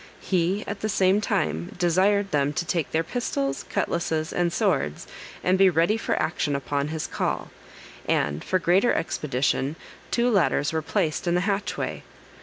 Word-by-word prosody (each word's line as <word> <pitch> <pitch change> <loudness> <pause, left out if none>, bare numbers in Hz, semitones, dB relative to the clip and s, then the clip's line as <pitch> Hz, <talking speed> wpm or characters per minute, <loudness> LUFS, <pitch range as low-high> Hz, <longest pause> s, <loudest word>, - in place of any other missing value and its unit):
He 185 +2 0
at 200 0 -5
the 215 - -2
same 195 0 +3
time 80 - -1
desired 190 +3 +2
them 145 0 +1
to 175 +3 -2
take 160 -2 -1
their 160 +1 0
pistols, 140 - -2
cutlasses, 160 -2 -1
and 175 -1 +1
swords, 75 - 0 0.4
and 185 +1 +2
be 195 -1 +7
ready 170 +5 +2
for 225 - -1
action 155 -3 0
upon 140 +1 -1
his 155 0 -3
call, - - -2 0.6
and, 75 +1 0
for 185 - +1
greater 185 +6 +3
expedition, 140 -2 -1 0.3
two 245 +1 +2
ladders 165 -7 +2
were 160 - 0
placed 155 +2 -1
in 175 - +2
the 180 - +2
hatchway. 200 +1 -2
170 Hz, 160 wpm, -25 LUFS, 145-195 Hz, 0.6 s, be